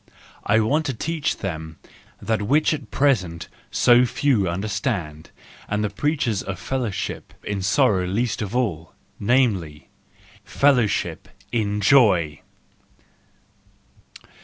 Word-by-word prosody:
I 105 +2 +4
want 145 +8 +1
to 135 - -2
teach 160 +4 -2
them 80 -4 -6 0.4
that 110 -1 -1
which 145 +10 +2
at 145 -4 -6
present 95 - 0 0.2
so 120 0 +5
few 120 -6 +1
understand, 95 - -3 0.4
and 105 +1 -1
the 105 - -1
preachers 120 - -1
of 95 -2 -5
fellowship 115 +2 -4
in 100 -2 -3
sorrow 95 -2 +2
least 110 +4 -1
of 105 +2 -4
all:_ 85 -11 -2 0.3
namel 120 -3 +3
y, 75 -2 -13 0.6
fellowship 105 - +1 0.2
in 105 -3 -1
joy 95 - +4
105 Hz, 110 wpm, -22 LUFS, 90-130 Hz, 0.6 s, so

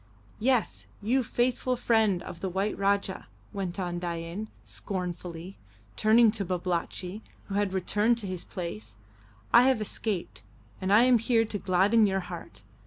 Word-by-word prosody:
"Yes, 250 0 +1 0.2
you 250 +5 +2
faithful 250 +1 0
friend 220 -7 +2
of 170 - -8
the 190 +1 -2
white 195 +3 -1
Rajah," 200 -1 0 0.3
went 195 -2 -4
on 175 -2 -2
Dain, 170 +4 -4 0.2
scornfully, 180 -1 -6 0.4
turning 220 +1 +5
to 210 -2 -2
Babalatchi, 180 +2 -3 0.3
who - - -4
had 200 -1 +1
returned 210 +5 +1
to 225 - -4
his 185 -2 -5
place, 110 - -6 0.6
"I 240 +1 +8
have 260 -4 +3
escaped, 210 - -3 0.4
and 190 +1 -1
I 215 +3 +7
am 250 -2 +5
here 230 0 +2
to 210 -1 -4
gladden 195 +5 +4
your 195 0 0
heart. 170 - -9
195 Hz, 150 wpm, -28 LUFS, 180-220 Hz, 0.6 s, I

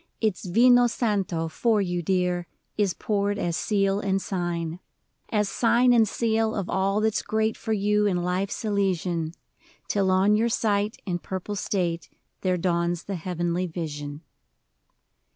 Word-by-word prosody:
Its 215 -5 -1
vino 245 +5 +6
santo 195 -8 -1
for 220 +7 +1
you, 175 -3 -1
dear, 180 0 0 0.3
Is 200 -4 +1
poured 205 -1 -1
as 175 -4 -1
seal 195 0 +1
and 195 -2 0
sign 175 -3 -3 0.3
— - - -50
As 210 -2 +1
sign 240 +4 +3
and 225 -2 +5
seal 225 0 0
of 195 -3 -2
all 195 +2 +1
that 220 0 +2
's - - 0
great 220 0 0
For 220 - -5
you, 210 0 +2
in 185 -3 +1
life's 185 +4 -2
Elysian: 180 -5 0 0.5
Till 195 -2 +1
on 190 +3 +4
your 230 +2 +2
sight, 210 -2 0
in 175 -3 -2
purple 190 +3 -5
state. 175 -4 -2 0.3
There 185 -1 +1
dawns 170 -1 0
the 200 - -5
Heavenly 175 0 -2
Vision 150 -3 -5
195 Hz, 150 wpm, -25 LUFS, 175-210 Hz, 0.5 s, vino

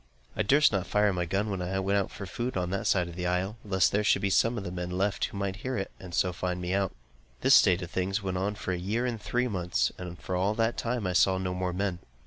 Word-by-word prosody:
I - - 0
durst 140 +9 +5
not 95 -3 -1
fire 105 -1 +3
my 90 -1 -1
gun 100 +5 -1
when 95 -2 -2
I 90 +2 -2
went 100 +1 +2
out 95 - -2
for 100 - -7
food 120 +5 -3
on 90 -1 -1
that 100 - -1
side 90 -3 +1
the 90 +1 -3
isle, 95 +5 -1
lest 95 -3 +2
there 105 +1 +1
should 105 - +3
be 100 - +1
some 115 +4 +3
of 105 - -3
the 90 - -5
men 90 -1 -4
left, 95 +2 0
who - - -7
might 100 -1 -2
hear 130 +3 -3
it, 95 - -3
and 90 -2 -7
so 90 -1 +2
find 90 0 -2
me 90 +1 -2
out. 100 -1 +1 0.5
This - - +5
state 90 0 +6
of 85 - -8
things 95 +2 0
went 95 -1 -2
on 100 +2 -1
for 100 -2 -4
a 90 - -1
year 110 +7 -1
and 120 -4 -3
three 125 +4 0
months, 85 - 0
and 90 -1 -7
for 90 - -4
all 95 +4 +1
that 115 +1 +1
time 120 -2 -2
I 90 - 0
saw 95 +2 +4
no 95 -1 -2
more 90 0 -1
men. 90 -1 -2
95 Hz, 280 wpm, -29 LUFS, 90-105 Hz, 0.5 s, state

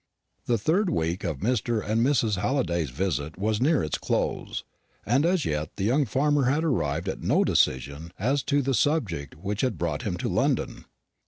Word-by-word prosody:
The 120 - +3
third 175 - +1
week 85 - -1
of 80 -6 -3
Mr. 115 0 0
and 110 +2 +2
Mrs. 115 -7 +2
Halliday's 85 - 0
visit 80 +1 -2
was 105 +3 0
near 150 +2 +3
its 75 - -2
close, - - -2 0.4
and 135 +8 +3
as 175 -4 +1
yet 75 +1 -2
the - - -3
young 135 +8 +3
farmer 140 +3 +2
had 145 +5 +2
arrived 85 - 0
at - - -3
no - - +3
decision 70 +5 0
as 135 +8 +1
to 145 -1 +2
the 135 +1 0
subject 105 - 0
which 100 +6 -3
had 130 - 0
brought 80 -4 -2
him - - -3
to - - -2
London. - - 0
110 Hz, 180 wpm, -26 LUFS, 85-140 Hz, 0.4 s, The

